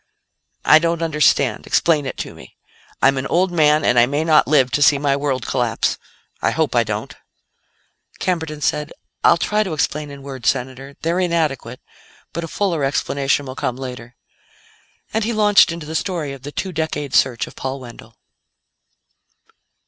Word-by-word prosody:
"I 155 - +7
don't 165 0 -1
understand; 150 -3 +2
explain 150 -5 +2
it - - -5
to - - -5
me. 65 - -15 0.5
I'm 135 0 +4
an 130 - -3
old 180 +2 +1
man, 155 -2 +3
and 120 - +4
I 120 - +5
may 145 +3 -1
not 155 -2 +4
live 135 -4 +3
to 145 - 0
see 145 0 +6
my 140 -1 +1
world 140 -4 -2
collapse. 120 -3 -1 0.4
I - - +2
hope 155 -6 -1
I 120 - +4
don't." 110 -1 -4 1.0
Camberton 160 -4 -2
said: 150 0 -1 0.3
"I'll 170 - +6
try 210 +4 0
to 190 -6 -2
explain 150 -1 -2
in 140 -1 -10
words, 135 -3 -2
Senator. 135 +2 -4
They're 170 +3 0
inadequate, 155 -9 -1 0.5
but 170 - -4
a - - -4
fuller 170 -4 -1
explanation 140 0 0
will 130 - -6
come 125 - -3
later." 125 -2 -8 1.0
And 220 0 0
he 230 +2 -1
launched 210 -4 +5
into 165 -2 -6
the 155 - -7
story 160 -5 -2
of 135 - -11
the 145 +2 -8
two 190 +5 -4
decade 150 -4 -3
search 125 -3 +2
of - - -14
Paul 135 +1 -4
Wendell. 120 -2 -13
145 Hz, 170 wpm, -20 LUFS, 130-165 Hz, 1.0 s, I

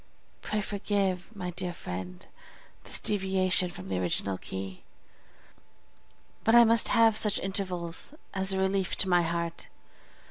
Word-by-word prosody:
Pray 215 - -1
forgive, 195 -2 -1
my 180 -3 -4
dear 180 0 -2
friend, 90 - -7 0.6
this - - -3
deviation 190 -2 +2
from 95 - -9
the 95 -1 -1
original 95 +1 -1
key, 95 -1 -6 1.6
but 225 - +4
I 240 - +10
must 230 -1 +3
have 225 -2 +5
such 210 -1 +2
intervals 185 - -2 0.2
as 190 0 0
a 190 - +2
relief 190 0 +1
to 190 - 0
my 175 -1 +5
heart. 170 0 -3
185 Hz, 135 wpm, -29 LUFS, 170-200 Hz, 1.6 s, I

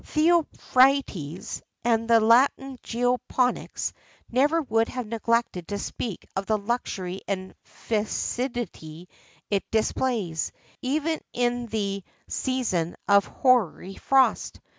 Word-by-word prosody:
Theophrastus, 275 - +2 0.2
and 230 -1 +2
the 230 -1 +7
Latin 255 +3 +3
geoponics, 245 +1 -1 0.4
never 295 +7 +3
would 225 -3 +1
have 250 -1 -4
neglected 230 -4 -1
to 205 - -3
speak 200 0 -5
of 195 0 -2
the 215 - +2
luxury 200 -4 -3
and 190 -1 -3
fecundity 215 - -3 0.4
it 200 -1 +1
displays, 220 -6 0 0.3
even 305 +4 -1
in 245 0 0
the 200 -3 -2 0.2
season 215 -11 -1
of 200 0 +5
hoary 225 - +1
frost. 270 -1 +2
230 Hz, 100 wpm, -26 LUFS, 200-255 Hz, 0.4 s, the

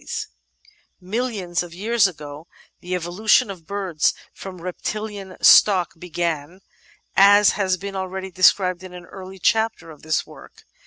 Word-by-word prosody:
s - - -5 0.7
1 180 - -18
Millions 210 -7 -2
of 175 -1 -9
years 215 +2 +2
ago 150 -2 -10 0.3
the 180 +1 -4
evolution 180 +4 +2
of 170 -5 -12
birds 190 -6 -1 0.2
from 190 -2 -9
a - - -14
reptilian 200 +1 -6
stock 185 -4 +6
began, 170 -1 -4 0.6
as 205 +1 +6
has 190 -2 0
been 195 +1 -7
already 190 0 -5
described 185 0 +3
in 185 -1 -11
an 180 0 -10
early 190 0 -11
chapter 220 -2 0
of 150 - -15
this 155 0 -1
work. - - -16
185 Hz, 150 wpm, -22 LUFS, 175-200 Hz, 0.7 s, stock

